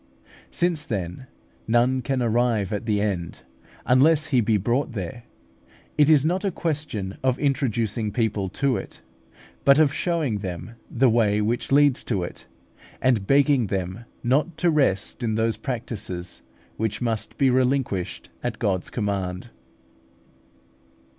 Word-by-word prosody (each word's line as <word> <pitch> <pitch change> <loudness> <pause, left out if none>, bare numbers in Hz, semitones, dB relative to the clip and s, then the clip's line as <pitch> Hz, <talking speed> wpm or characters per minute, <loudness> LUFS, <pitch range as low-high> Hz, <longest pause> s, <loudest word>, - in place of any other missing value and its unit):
Since, 170 -4 0
then, 100 - -4 0.4
none 120 +3 +3
can 135 -1 -1
arrive 115 -3 +1
at 105 +3 -4
the 105 -2 +2
end 90 -9 -2 0.4
unless 150 +5 +4
he 130 -5 +3
be 110 -1 +2
brought 120 +6 0
there, 110 +4 -6 0.7
it 150 0 +4
is 150 -2 +5
not 180 +5 0
a 200 - +1
question 150 - -3
of 130 -1 +1
introducing 115 -6 0
people 105 -5 -1
to 135 +5 0
it, - - -9 0.6
but 140 0 +6
of 155 -3 +4
showing 160 - -1
them 95 +2 -6 0.2
the 130 +2 +3
way 110 -3 +3
which 115 +5 -1
leads 145 -1 +4
to 100 -7 -1
it, 85 - -8 0.5
and 115 -7 +1
begging 140 -4 +4
them 95 +3 -3 0.2
not 145 +7 +1
to 175 -2 +2
rest 130 -9 +1
in 110 -2 0
those 110 0 +1
practices 105 -8 -5 0.4
which 110 -1 -2
must 115 -3 -2
be 135 -2 +3
relinquished 125 -7 0
at 120 -3 -3
God's 95 -5 -1
command. 100 -1 -3
120 Hz, 140 wpm, -24 LUFS, 105-135 Hz, 0.7 s, but